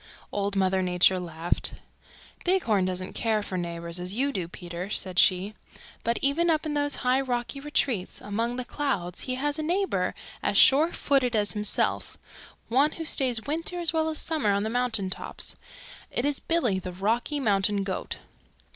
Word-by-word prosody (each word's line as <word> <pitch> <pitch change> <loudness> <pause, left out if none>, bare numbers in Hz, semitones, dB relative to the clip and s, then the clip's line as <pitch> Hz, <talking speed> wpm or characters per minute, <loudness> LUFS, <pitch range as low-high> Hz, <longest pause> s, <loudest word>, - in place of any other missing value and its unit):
Old 200 0 -2
Mother 190 -1 +2
Nature 180 0 +3
laughed. 170 -1 -2 0.7
"Bighorn 235 - +2
doesn't 185 0 -3
care 220 -2 0
for 190 - -5
neighbors 170 -1 -3
as 180 +3 -2
you 275 +4 +1
do, 185 -10 -3
Peter," 175 +1 -7
said 185 -3 -1
she. 190 +3 +3 0.5
"But 235 +1 +1
even 315 +5 +2
up 315 -1 +1
in 305 - -2
those 290 -1 +1
high 255 +2 +3
rocky 250 +1 -3
retreats 270 -9 -1
among 230 +4 -2
the 255 0 -4
clouds 195 - -2
he 255 - 0
has 290 +3 -1
a - - 0
neighbor 370 +5 0 0.3
as - - 0
sure 305 +5 +6
footed 260 -4 +1
as 205 -1 +3
himself, 210 -1 -1 0.5
one 275 +6 +3
who 325 - -6
stays 250 -7 +3
winter 330 +4 -2
as 340 -1 +1
well 320 0 +1
as 310 - -2
summer 300 -12 +1
on 200 0 +1
the 220 - -2
mountain 230 -6 0
tops. - - +2 0.5
It 245 - -1
is 290 -1 +1
Billy 250 - +1
the 185 -1 -7
Rocky 230 +10 0
Mountain 200 -4 +1
Goat. 190 -1 -4
230 Hz, 175 wpm, -27 LUFS, 190-285 Hz, 0.7 s, sure